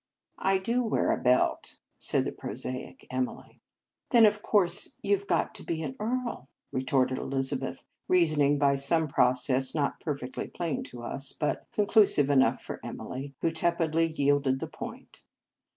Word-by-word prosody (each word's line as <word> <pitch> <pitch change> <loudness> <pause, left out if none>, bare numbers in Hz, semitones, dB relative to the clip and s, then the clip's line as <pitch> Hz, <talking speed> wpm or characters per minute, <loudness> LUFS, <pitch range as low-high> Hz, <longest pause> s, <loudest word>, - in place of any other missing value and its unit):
" - - -55
I 195 0 +2
do 230 +6 0
wear 225 - +1
a - - -1
belt," 125 0 +1 0.2
said - - 0
the - - -2
prosaic 130 +1 -7
Emily. 130 0 -4 0.2
" - - -49
Then, 235 -4 +7
of 210 0 +2
course, 185 -5 +3
you 200 0 +3
ve 200 +1 -8
got 175 -4 0
to - - -10
be 160 -1 -3
an 135 -3 -5
earl," 235 - -3 0.2
retorted 130 0 0
Elizabeth; 135 0 -2 0.2
reason 165 -5 +3
ing 145 +1 +3
by 140 -1 +3
some 160 +4 +2
process, 130 0 +2
not 145 -2 -1
perfectly 140 -4 -4
plain 170 -3 -3
to 120 -1 -10
us, 135 +2 -3
but 150 - -2
conclusive 200 -9 +4
enough 135 -1 +3
for - - -6
Emily, 135 +2 -7
who 165 - +1
tepidly 165 -1 +1
yielded 140 -3 +1
the - - -3
point. - - -10
145 Hz, 165 wpm, -28 LUFS, 135-180 Hz, 0.2 s, Then